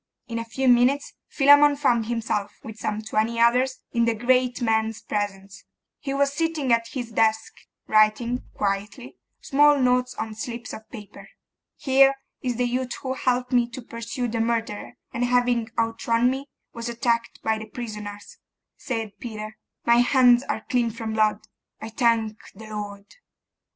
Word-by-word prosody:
In 230 Hz, -1 st, -3 dB
a 230 Hz, -, -4 dB
few 260 Hz, +4 st, -2 dB
minutes 250 Hz, +3 st, +3 dB
Philammon 285 Hz, +1 st, +6 dB
found 240 Hz, -6 st, +1 dB
himself, 225 Hz, -3 st, -2 dB
with 220 Hz, 0 st, -9 dB
some 215 Hz, 0 st, -3 dB
twenty 220 Hz, +2 st, -1 dB
others, 250 Hz, +3 st, +3 dB
in 235 Hz, -1 st, +2 dB
the 230 Hz, -1 st, +1 dB
great 250 Hz, +2 st, +2 dB
man's 220 Hz, -1 st, 0 dB
presence: 195 Hz, -2 st, -4 dB, 0.4 s
he 275 Hz, -, -5 dB
was 280 Hz, 0 st, +1 dB
sitting 315 Hz, -5 st, 0 dB
at 230 Hz, 0 st, +1 dB
his 245 Hz, -4 st, -6 dB
desk, 220 Hz, 0 st, +1 dB, 0.3 s
writing, 215 Hz, +3 st, +2 dB
quietly, 205 Hz, +5 st, -3 dB, 0.2 s
small 290 Hz, +1 st, +4 dB
notes 250 Hz, -1 st, +1 dB
on 220 Hz, -, -4 dB
slips 235 Hz, +2 st, -6 dB
of 220 Hz, -, -10 dB
paper. 210 Hz, -4 st, -11 dB, 0.5 s
'Here 270 Hz, 0 st, +4 dB, 0.3 s
is 250 Hz, -2 st, -2 dB
the 245 Hz, +1 st, 0 dB
youth 250 Hz, 0 st, -2 dB
who 260 Hz, -1 st, -2 dB
helped 250 Hz, -1 st, -1 dB
me 240 Hz, -1 st, +3 dB
to 255 Hz, +2 st, -8 dB
pursue 230 Hz, +2 st, -4 dB
the 230 Hz, 0 st, -2 dB
murderer, 225 Hz, -2 st, -2 dB, 0.2 s
and 240 Hz, -, -1 dB
having 245 Hz, -2 st, +1 dB
outrun 230 Hz, +1 st, +1 dB
me, 270 Hz, +2 st, -5 dB, 0.3 s
was 235 Hz, 0 st, -5 dB
attacked 235 Hz, -1 st, -1 dB
by 220 Hz, 0 st, 0 dB
the 220 Hz, -, -8 dB
prisoners,' 210 Hz, -3 st, -8 dB, 0.4 s
said 225 Hz, -4 st, -4 dB
Peter. 215 Hz, -2 st, -7 dB, 0.3 s
'My 235 Hz, 0 st, +5 dB
hands 245 Hz, 0 st, +5 dB
are 220 Hz, -4 st, -4 dB
clean 240 Hz, -2 st, +1 dB
from 225 Hz, 0 st, -5 dB
blood, 215 Hz, -1 st, +2 dB, 0.4 s
I 220 Hz, -, -7 dB
thank 225 Hz, -2 st, +1 dB, 0.2 s
the 220 Hz, +3 st, -11 dB
Lord! 205 Hz, -1 st, -6 dB
235 Hz, 155 wpm, -24 LUFS, 220-250 Hz, 0.5 s, Philammon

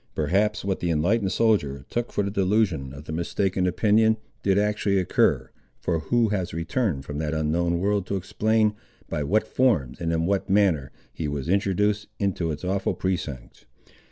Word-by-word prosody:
Perhaps 100 Hz, +8 st, +1 dB
what 95 Hz, -1 st, -1 dB
the 85 Hz, -, -1 dB
enlightened 95 Hz, +6 st, +1 dB
soldier 75 Hz, -, +1 dB
took 120 Hz, 0 st, -2 dB
for 105 Hz, -, 0 dB
the 100 Hz, -, -2 dB
delusion 95 Hz, -8 st, +1 dB
of 75 Hz, +2 st, -11 dB
mistaken 90 Hz, +3 st, 0 dB
opinion 110 Hz, +4 st, +3 dB, 0.2 s
did 95 Hz, -1 st, +2 dB
actually 105 Hz, -1 st, +1 dB
occur, 90 Hz, -3 st, +1 dB, 0.3 s
for 85 Hz, -2 st, -1 dB
who 115 Hz, +8 st, +1 dB
has 95 Hz, -5 st, -2 dB
returned 85 Hz, -, -1 dB
from 75 Hz, +1 st, -5 dB
that 80 Hz, 0 st, -2 dB
unknown 85 Hz, +3 st, +1 dB
world 100 Hz, +1 st, 0 dB
to 100 Hz, -, -1 dB
explain 105 Hz, +3 st, +1 dB, 0.4 s
by 75 Hz, -, -2 dB
what 100 Hz, +10 st, +1 dB
forms, 105 Hz, -, +1 dB
and 85 Hz, -1 st, 0 dB
in 80 Hz, 0 st, 0 dB
what 100 Hz, +2 st, 0 dB
manner, 95 Hz, -9 st, +2 dB, 0.2 s
he 80 Hz, -, -3 dB
was 70 Hz, 0 st, -3 dB
introduced 100 Hz, +2 st, +1 dB
into 95 Hz, -4 st, -1 dB
its 75 Hz, +2 st, -6 dB
awful 95 Hz, +1 st, 0 dB
precincts? 85 Hz, -9 st, -4 dB
95 Hz, 165 wpm, -25 LUFS, 80-105 Hz, 0.4 s, opinion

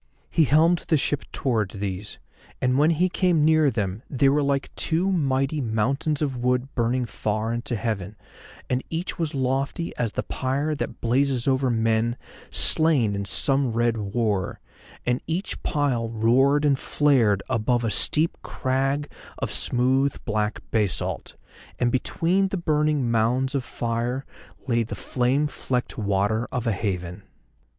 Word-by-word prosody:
He 160 Hz, -, +4 dB
helmed 160 Hz, +5 st, +3 dB
the 160 Hz, -, +3 dB
ship 145 Hz, 0 st, -1 dB
towards 110 Hz, -7 st, -1 dB
these, 100 Hz, 0 st, -5 dB, 0.4 s
and 125 Hz, +1 st, +2 dB
when 150 Hz, +2 st, +5 dB
he 170 Hz, +2 st, +3 dB
came 175 Hz, -4 st, +2 dB
near 155 Hz, -2 st, +5 dB
them 105 Hz, -4 st, -2 dB
they 135 Hz, 0 st, +3 dB
were 145 Hz, +2 st, +2 dB
like 140 Hz, -1 st, -1 dB
two 175 Hz, +4 st, 0 dB
mighty 140 Hz, -3 st, +1 dB
mountains 135 Hz, +6 st, 0 dB
of 135 Hz, -3 st, -1 dB
wood 125 Hz, +3 st, 0 dB
burning 120 Hz, +1 st, 0 dB
far 110 Hz, 0 st, -2 dB
into 120 Hz, +2 st, -3 dB
heaven, 105 Hz, -3 st, -3 dB, 0.5 s
and 125 Hz, +1 st, -1 dB
each 170 Hz, +3 st, -4 dB
was 160 Hz, -3 st, -1 dB
lofty 135 Hz, +5 st, -1 dB
as 115 Hz, -3 st, -1 dB
the -, -, -2 dB
pyre 140 Hz, +4 st, -1 dB
that 150 Hz, -, -5 dB
blazes 130 Hz, +1 st, +1 dB
over 130 Hz, -1 st, +2 dB
men 115 Hz, 0 st, +1 dB, 0.3 s
slain 150 Hz, -10 st, +2 dB
in 100 Hz, 0 st, -3 dB
some 135 Hz, +5 st, 0 dB
red 120 Hz, 0 st, +2 dB
war, 105 Hz, -2 st, -1 dB, 0.5 s
and 125 Hz, +1 st, +1 dB
each 170 Hz, +6 st, -3 dB
pile 130 Hz, -7 st, 0 dB
roared 130 Hz, +6 st, +3 dB
and 140 Hz, -2 st, +3 dB
flared 120 Hz, -10 st, +2 dB
above 120 Hz, 0 st, +1 dB
a 115 Hz, -, 0 dB
steep 155 Hz, +8 st, +2 dB
crag 135 Hz, +2 st, -1 dB, 0.3 s
of -, -, -3 dB
smooth 130 Hz, +3 st, +2 dB
black 105 Hz, -1 st, -1 dB
basalt, 105 Hz, -5 st, -1 dB, 0.4 s
and 120 Hz, 0 st, +1 dB
between 175 Hz, +9 st, +1 dB
the 190 Hz, -, -3 dB
burning 150 Hz, -6 st, +1 dB
mounds 125 Hz, +4 st, +1 dB
of 135 Hz, -2 st, 0 dB
fire 120 Hz, +3 st, -2 dB, 0.4 s
lay 120 Hz, -2 st, +2 dB
the 115 Hz, -, -4 dB
flame 130 Hz, +4 st, 0 dB
flecked 125 Hz, -3 st, -3 dB
water 105 Hz, +2 st, 0 dB
of 125 Hz, -1 st, -2 dB
a 115 Hz, -, +2 dB
haven. 90 Hz, -3 st, -3 dB
130 Hz, 150 wpm, -24 LUFS, 115-145 Hz, 0.5 s, when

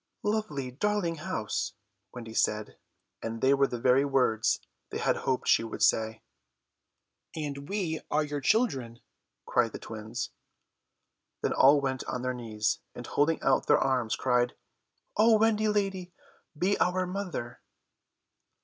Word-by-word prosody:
"Lovely, 155 Hz, -12 st, -1 dB
darling 175 Hz, +3 st, 0 dB
house," 110 Hz, -, -3 dB, 0.4 s
Wendy 115 Hz, -2 st, -8 dB
said, 105 Hz, -1 st, 0 dB, 0.4 s
and 115 Hz, 0 st, -4 dB
they 135 Hz, +3 st, +4 dB
were 140 Hz, 0 st, +3 dB
the 125 Hz, -, -4 dB
very 130 Hz, +3 st, +4 dB
words 130 Hz, -6 st, +2 dB, 0.3 s
they -, -, -4 dB
had -, -, +1 dB
hoped 130 Hz, -1 st, -1 dB
she -, -, +5 dB
would 115 Hz, -, -3 dB
say. 110 Hz, 0 st, +2 dB, 1.1 s
"And 145 Hz, -3 st, -5 dB
we 180 Hz, -6 st, -1 dB
are 155 Hz, +1 st, +2 dB
your 145 Hz, -1 st, -4 dB
children," 135 Hz, -, +1 dB, 0.4 s
cried 115 Hz, -3 st, +1 dB
the -, -, -4 dB
twins. 110 Hz, 0 st, -6 dB, 1.1 s
Then -, -, +1 dB
all 145 Hz, +2 st, +6 dB
went 130 Hz, -1 st, -2 dB
on 125 Hz, -, -4 dB
their 125 Hz, 0 st, -1 dB
knees, 110 Hz, -3 st, -1 dB, 0.2 s
and -, -, -7 dB
holding 155 Hz, +3 st, +1 dB
out 135 Hz, -1 st, +2 dB
their -, -, +6 dB
arms 125 Hz, -4 st, +1 dB
cried, 125 Hz, -1 st, +1 dB, 0.6 s
"O 220 Hz, +1 st, +6 dB
Wendy 215 Hz, 0 st, +3 dB
lady, 195 Hz, -4 st, -1 dB, 0.5 s
be 190 Hz, +6 st, +1 dB
our 185 Hz, +1 st, +2 dB
mother." 180 Hz, -11 st, -5 dB
135 Hz, 140 wpm, -29 LUFS, 120-185 Hz, 1.1 s, all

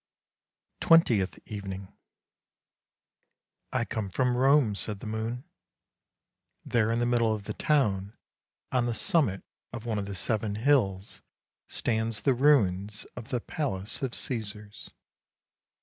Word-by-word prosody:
TWENTIETH 120 Hz, -, +4 dB
EVENING 100 Hz, -2 st, -7 dB, 0.8 s
" -, -, -55 dB
I -, -, 0 dB
come 105 Hz, -3 st, -3 dB
from 125 Hz, +6 st, +1 dB
Rome," 135 Hz, -3 st, +4 dB
said 100 Hz, 0 st, -4 dB
the -, -, -9 dB
moon. 110 Hz, +3 st, -3 dB, 0.6 s
" -, -, -53 dB
There 115 Hz, -2 st, +3 dB
in 115 Hz, -, +1 dB
the 120 Hz, -, +1 dB
middle 115 Hz, -2 st, +2 dB
of 105 Hz, -, -8 dB
the -, -, -5 dB
town, 105 Hz, -9 st, +1 dB, 0.5 s
on 125 Hz, -2 st, +2 dB
the 120 Hz, -, -1 dB
summit 110 Hz, -, +1 dB, 0.3 s
of 115 Hz, -, -7 dB
one 110 Hz, -3 st, -1 dB
of 100 Hz, -, -4 dB
the 100 Hz, -, -5 dB
seven 105 Hz, +3 st, -1 dB
hills, 110 Hz, -6 st, +1 dB, 0.5 s
stands 110 Hz, -1 st, -1 dB
the 135 Hz, -, +3 dB
ruins 105 Hz, -7 st, +2 dB
of 115 Hz, -2 st, -8 dB
the 125 Hz, -, -2 dB
palace 105 Hz, -11 st, -3 dB
of 130 Hz, -3 st, -2 dB
Caesars. 105 Hz, -4 st, -6 dB
110 Hz, 135 wpm, -28 LUFS, 100-125 Hz, 0.8 s, TWENTIETH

